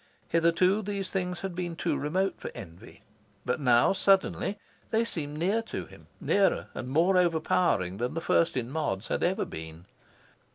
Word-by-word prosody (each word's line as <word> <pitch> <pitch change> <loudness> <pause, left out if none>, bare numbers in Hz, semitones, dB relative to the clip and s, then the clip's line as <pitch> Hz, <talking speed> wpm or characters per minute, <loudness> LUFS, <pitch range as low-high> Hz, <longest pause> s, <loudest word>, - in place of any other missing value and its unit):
Hitherto, 170 +5 +3
these 200 -2 -4
things 180 -2 -2
had 190 -2 -4
been 175 -1 -4
too 165 -2 -1
remote 185 +8 0
for - - -5
envy. 85 +7 -11 0.4
But 125 +4 0
now, 125 +2 +4
suddenly, 195 +1 +2 0.3
they 225 +1 +2
seemed 150 -9 -4
near 195 +8 +1
to 225 - -6
him - - -16
nearer 200 -1 +2
and 125 - -5
more 170 +7 +3
overpowering 160 - +1
than 125 +5 -2
the - - 0
First 165 -3 +2
in 125 0 -3
Mods 135 -10 -2
had - - -1
ever 190 +4 +1
been. 80 +2 -9
170 Hz, 165 wpm, -28 LUFS, 130-190 Hz, 0.4 s, now